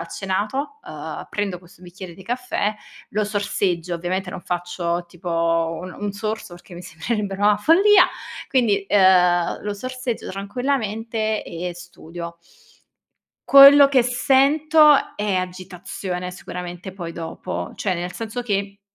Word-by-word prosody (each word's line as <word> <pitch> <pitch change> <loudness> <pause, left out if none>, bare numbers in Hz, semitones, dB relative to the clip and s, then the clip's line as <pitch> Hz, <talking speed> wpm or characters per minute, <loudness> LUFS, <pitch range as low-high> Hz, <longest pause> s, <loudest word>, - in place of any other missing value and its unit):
cenato, 210 - -3
uhm, - - -7
prendo 200 -3 -2
questo 175 0 -20
bicchiere 180 0 -10
di 190 - -14
caffè, 240 -2 -2 0.3
lo 215 +1 0
sorseggio, 195 -4 -1
ovviamente 180 +2 -3
non 180 - -7
faccio 175 -1 -3
tipo 165 -1 -1
un 185 +1 -7
un 205 0 -2
sorso 215 -2 -5
perché 175 0 -13
mi 175 - -8
sembrerebbe 200 +4 -3
una 205 0 +5
follia, 380 - +6 0.4
quindi, 215 -7 +1
uhm, 180 -3 +4
lo 205 0 -2
sorseggio 255 +2 -5
tranquillamente 220 0 -2
e 175 +2 -5
studio. 170 -1 -9 1.1
Quello 280 +1 +10
che 270 -3 +3
sento 295 +5 +4 0.2
è 210 -1 -1
agitazione, 180 0 -5
sicuramente 180 0 -8
poi 175 -3 -6
dopo, 170 +2 -6
cioè 190 -3 -2
nel 175 +1 -4
senso 230 +2 -5
che, 200 -2 -3
195 Hz, 125 wpm, -22 LUFS, 175-225 Hz, 1.1 s, Quello